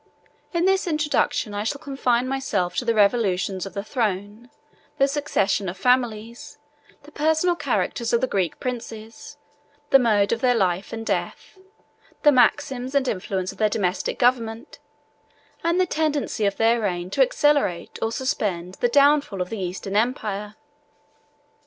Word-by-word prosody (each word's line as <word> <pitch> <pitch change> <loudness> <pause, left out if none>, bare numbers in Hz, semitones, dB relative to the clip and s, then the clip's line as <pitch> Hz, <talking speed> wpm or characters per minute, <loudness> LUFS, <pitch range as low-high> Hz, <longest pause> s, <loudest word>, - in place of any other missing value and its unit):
In 340 0 0
this 385 0 +2
introduction, 300 -8 0
I 205 0 -2
shall 255 +6 -2
confine 255 -4 0
myself 210 -10 -1
to 250 - -1
the 230 -1 +1
revolutions 200 -3 +1
of 190 - -12
the 200 - -3
throne, 215 0 -3 0.5
the 275 - +4
succession 270 -9 0
of 180 - -7
families, 245 +3 -1 0.5
the 295 - -15
personal 315 +4 +1
characters 235 -7 -1
of 235 - +3
the 260 - +1
Greek 190 -8 -2
princes, 230 -3 -7 0.5
the 270 - +8
mode 210 -5 +2
of 230 0 -1
their 250 -1 +3
life 190 -3 0
and 225 0 -6
death, 380 - -4 0.6
the 295 - +7
maxims 260 0 +1
and 275 -2 +2
influence 185 -2 -2
of - - -16
their 215 -1 +3
domestic 190 -3 -1
government, 230 -2 0 0.8
and 340 +2 +1
the 370 - +4
tendency 300 - -1
of 200 - -2
their 230 +1 +3
reign 180 -3 -2
to - - +1
accelerate 295 - +1
or 225 - 0
suspend 190 -8 -2
the 245 - +2
downfall 280 -5 +3
of 180 0 -3
the 225 - -4
Eastern 190 +2 -4
empire. 210 -2 -1
230 Hz, 150 wpm, -23 LUFS, 200-275 Hz, 0.8 s, the